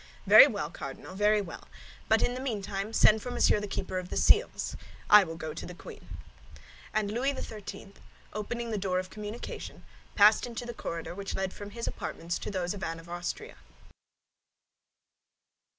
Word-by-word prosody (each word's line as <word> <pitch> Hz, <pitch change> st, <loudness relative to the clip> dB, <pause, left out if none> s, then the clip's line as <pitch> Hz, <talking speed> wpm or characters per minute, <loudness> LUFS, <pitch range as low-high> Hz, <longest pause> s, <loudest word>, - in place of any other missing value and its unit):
"Very -, -, +10 dB
well, -, -, -3 dB
Cardinal, -, -, -8 dB
very 210 Hz, +2 st, +3 dB
well; 175 Hz, -5 st, -9 dB, 0.4 s
but, 220 Hz, 0 st, +5 dB, 0.2 s
meantime, 205 Hz, -4 st, -3 dB
send 220 Hz, -1 st, +5 dB
for 250 Hz, -, -5 dB
Monsieur 230 Hz, -, +3 dB
the 205 Hz, -, -4 dB
Keeper 190 Hz, -1 st, -3 dB
of 180 Hz, 0 st, -8 dB
the -, -, -3 dB
Seals. -, -, +3 dB, 0.4 s
I 210 Hz, -1 st, +10 dB
will 165 Hz, -3 st, -6 dB
go 160 Hz, -1 st, -5 dB
to 165 Hz, -, -7 dB
the 180 Hz, -, -8 dB
queen." -, -, -11 dB, 0.7 s
And 210 Hz, -1 st, 0 dB
Louis 265 Hz, +4 st, 0 dB
XIII., 210 Hz, -2 st, -8 dB, 0.4 s
opening 230 Hz, +2 st, -4 dB
the 215 Hz, -, -1 dB
door 185 Hz, -1 st, 0 dB
of 185 Hz, 0 st, -3 dB
communication, 210 Hz, +2 st, -7 dB, 0.3 s
passed 210 Hz, +3 st, +6 dB
into 240 Hz, 0 st, -6 dB
the 240 Hz, -, -5 dB
corridor 170 Hz, -6 st, -5 dB
which 200 Hz, +1 st, -5 dB
led 190 Hz, -1 st, -2 dB
from 205 Hz, 0 st, -8 dB
his 230 Hz, +3 st, -5 dB
apartments 165 Hz, 0 st, -4 dB
to -, -, -5 dB
those 185 Hz, -2 st, -2 dB
of 200 Hz, -, -8 dB
Anne 165 Hz, 0 st, -3 dB
of 165 Hz, +1 st, -14 dB
Austria. 175 Hz, 0 st, -5 dB
205 Hz, 165 wpm, -29 LUFS, 185-215 Hz, 0.7 s, Very